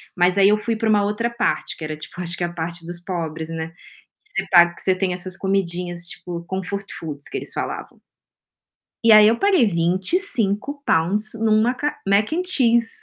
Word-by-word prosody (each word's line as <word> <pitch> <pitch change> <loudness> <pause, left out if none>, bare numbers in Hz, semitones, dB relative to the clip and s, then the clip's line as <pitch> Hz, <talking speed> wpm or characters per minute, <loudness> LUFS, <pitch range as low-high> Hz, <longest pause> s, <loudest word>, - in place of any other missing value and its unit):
Mas 180 +1 +3
aí 195 0 +6
eu 210 - +4
fui 220 +2 -2
pra 220 0 -1
uma 205 -1 +4
outra 210 +3 -1
parte, 235 +1 -2
que - - -9
era 155 0 -4
tipo, 155 - -11
acho 170 -1 -4
que - - -3
a 175 - -2
parte 170 0 -5
dos 175 +1 -7
pobres, 165 -3 -5
né, 165 0 -4
que 295 - -21
você - - -14
paga 175 -1 +6
que - - -5
você 190 - +3
tem 185 -1 -1
essas 180 0 -4
comidinhas, 180 -3 -2
tipo 170 -1 -7
comfort 190 +2 -4
foods, 145 -3 -6
que - - -4
eles - - -5
falavam. - - -5 1.0
E 230 -1 +6
aí, 215 0 +8
eu 230 - +2
paguei 385 - +4
£25 205 - 0
numa 225 +2 +2
ca 295 +3 -3
Mac 200 +6 +2
and 345 +3 0
Cheese. 235 -9 +3
195 Hz, 195 wpm, -21 LUFS, 175-225 Hz, 1.0 s, aí